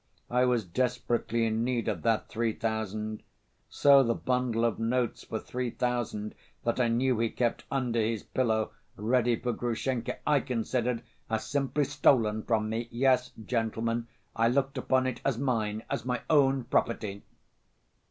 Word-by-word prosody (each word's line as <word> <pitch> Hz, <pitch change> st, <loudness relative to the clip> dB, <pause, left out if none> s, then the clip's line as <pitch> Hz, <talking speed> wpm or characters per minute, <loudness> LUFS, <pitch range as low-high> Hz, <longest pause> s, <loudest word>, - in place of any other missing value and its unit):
I 125 Hz, +1 st, +4 dB
was 120 Hz, -4 st, +1 dB
desperately 120 Hz, +2 st, 0 dB
in 110 Hz, 0 st, 0 dB
need 120 Hz, -1 st, -1 dB
of 100 Hz, -7 st, -1 dB
that 115 Hz, +3 st, +1 dB
three 115 Hz, 0 st, -1 dB
thousand... 110 Hz, -1 st, -3 dB, 0.5 s
so 140 Hz, -1 st, +6 dB
the 115 Hz, -3 st, +1 dB
bundle 125 Hz, -2 st, 0 dB
of 115 Hz, -, 0 dB
notes 120 Hz, +1 st, 0 dB
for 110 Hz, -, -3 dB
three 125 Hz, +2 st, -3 dB
thousand 120 Hz, -4 st, -2 dB, 0.3 s
that 115 Hz, +2 st, 0 dB
I 125 Hz, -, +3 dB
knew 120 Hz, +1 st, +1 dB
he 115 Hz, 0 st, +2 dB
kept 120 Hz, 0 st, -1 dB
under 125 Hz, -4 st, 0 dB
his 110 Hz, -1 st, -1 dB
pillow, 110 Hz, -4 st, 0 dB, 0.2 s
ready 120 Hz, +2 st, +2 dB
for 120 Hz, +2 st, -2 dB
Grushenka, 120 Hz, +1 st, -2 dB
I 150 Hz, -1 st, +5 dB
considered 120 Hz, -1 st, -1 dB, 0.3 s
as 110 Hz, 0 st, -1 dB
simply 140 Hz, +1 st, 0 dB
stolen 125 Hz, -6 st, +3 dB
from 110 Hz, -1 st, 0 dB
me. 115 Hz, +2 st, -2 dB
Yes, 125 Hz, +1 st, +2 dB, 0.2 s
gentlemen, 115 Hz, 0 st, -1 dB, 0.3 s
I 115 Hz, +1 st, +3 dB
looked 135 Hz, +2 st, +1 dB
upon 130 Hz, 0 st, +2 dB
it 130 Hz, -, -3 dB
as 135 Hz, -4 st, +1 dB
mine, 110 Hz, -5 st, -1 dB
as -, -, -2 dB
my 125 Hz, -1 st, -2 dB
own 135 Hz, -3 st, +4 dB
property...." 105 Hz, -4 st, -1 dB
120 Hz, 155 wpm, -29 LUFS, 110-125 Hz, 0.5 s, so